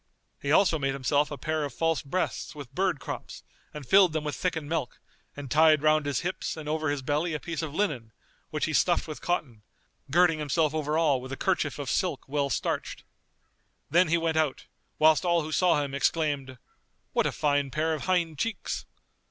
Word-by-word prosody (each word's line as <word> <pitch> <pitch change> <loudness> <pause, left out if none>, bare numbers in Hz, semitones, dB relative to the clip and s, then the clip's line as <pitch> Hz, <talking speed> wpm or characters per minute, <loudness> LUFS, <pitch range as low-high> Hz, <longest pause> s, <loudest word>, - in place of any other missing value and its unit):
He 140 - -1
also 165 -1 +4
made 135 -1 0
himself 140 +2 +1
a 145 - -6
pair 155 +1 -2
of 145 - -5
false 165 -1 +1
breasts 170 +2 -3
with 145 -5 -9
birds' 185 -3 +1
crops 120 - -7 0.3
and 150 -2 -8
filled 190 +1 +5
them 155 -1 -1
with 150 -1 -3
thickened 160 -5 -2
milk 150 -5 -3 0.4
and 140 -3 -7
tied 155 -1 +5
round 155 -1 +3
his 140 -3 0
hips 180 -1 -3
and 155 -2 -7
over 155 0 -1
his 145 -2 -2
belly 150 +4 0
a - - -3
piece 165 0 -4
of 155 -2 -5
linen, 135 - -1 0.4
which - - -1
he - - -3
stuffed - - +2
with 155 - -7
cotton, 140 -11 -2 0.5
girding 165 +1 +4
himself 150 +1 +1
over 155 0 -1
all 145 -6 +2
with 130 +1 -9
a 135 - -4
kerchief 175 -6 0
of 145 -2 -5
silk 180 -7 -1
well 140 0 0
starched. 125 - -2 0.9
Then 175 +2 +5
he 170 +2 +3
went 165 -1 0
out, 155 -4 0 0.3
whilst 155 +2 +5
all 170 -2 +2
who 155 - -6
saw 165 -3 +3
him 140 -1 -5
exclaimed, 140 -3 0 0.6
"What - - +2
a - - -1
fine 145 -1 +1
pair 155 +3 0
of 155 - -4
hind 170 -5 0
cheeks!" 230 - -3
155 Hz, 200 wpm, -27 LUFS, 145-165 Hz, 0.9 s, filled